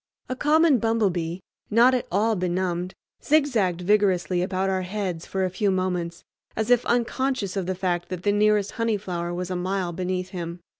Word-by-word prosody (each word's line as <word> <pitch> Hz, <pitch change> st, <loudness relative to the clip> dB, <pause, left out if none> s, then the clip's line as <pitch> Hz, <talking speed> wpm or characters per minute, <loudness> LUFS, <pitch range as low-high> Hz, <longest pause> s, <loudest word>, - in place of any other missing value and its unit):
A 255 Hz, -, -2 dB
common 300 Hz, 0 st, +4 dB
bumblebee, 190 Hz, -6 st, 0 dB, 0.3 s
not 235 Hz, +4 st, +5 dB
at 250 Hz, -, -1 dB
all 215 Hz, +4 st, +2 dB
benumbed, 180 Hz, 0 st, -2 dB, 0.3 s
zigzagged 235 Hz, -, +2 dB
vigorously 185 Hz, -2 st, +2 dB
about 190 Hz, +1 st, -1 dB
our 190 Hz, -1 st, 0 dB
heads 185 Hz, -3 st, -4 dB
for 190 Hz, -1 st, -1 dB
a -, -, -1 dB
few 200 Hz, +3 st, 0 dB
moments, 180 Hz, -2 st, -2 dB, 0.3 s
as 220 Hz, +2 st, -1 dB
if 245 Hz, -1 st, +5 dB
unconscious 240 Hz, -3 st, 0 dB
of 190 Hz, -3 st, -2 dB
the 185 Hz, -, -1 dB
fact 175 Hz, -2 st, -2 dB
that 180 Hz, -1 st, -5 dB
the 205 Hz, -, +3 dB
nearest 210 Hz, -1 st, +2 dB
honey 230 Hz, -2 st, 0 dB
flower 175 Hz, -3 st, -4 dB
was 180 Hz, +1 st, -4 dB
a -, -, -1 dB
mile 180 Hz, 0 st, -2 dB
beneath 185 Hz, +1 st, -3 dB
him. 175 Hz, -2 st, -6 dB
190 Hz, 180 wpm, -25 LUFS, 180-215 Hz, 0.3 s, not